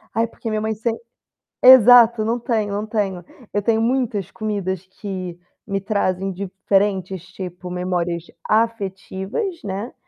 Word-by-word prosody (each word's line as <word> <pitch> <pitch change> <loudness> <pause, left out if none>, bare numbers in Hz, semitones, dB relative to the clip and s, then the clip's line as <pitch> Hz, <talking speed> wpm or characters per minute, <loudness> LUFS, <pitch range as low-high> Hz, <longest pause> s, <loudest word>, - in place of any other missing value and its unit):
"Ai 225 +1 +2
porque 230 0 -7
minha 215 -1 -1
mãe 220 0 -1
sem" 225 +2 -2 0.7
Exato, 240 -3 +8
não 230 +2 0
tenho 220 -4 -1
não 205 +1 -2
tenho. 200 -5 -2 0.3
Eu 205 - +1
tenho 225 +1 +2
muitas 230 -5 0
comidas 195 -4 -3
que 185 -4 -5 0.3
me 195 0 -2
trazem 195 -2 -1
diferentes 190 -1 -1
tipo 180 -1 -8
memórias 175 -2 -2 0.2
afetivas, 215 - -1
né, 200 +4 -4
205 Hz, 130 wpm, -21 LUFS, 190-225 Hz, 0.7 s, Exato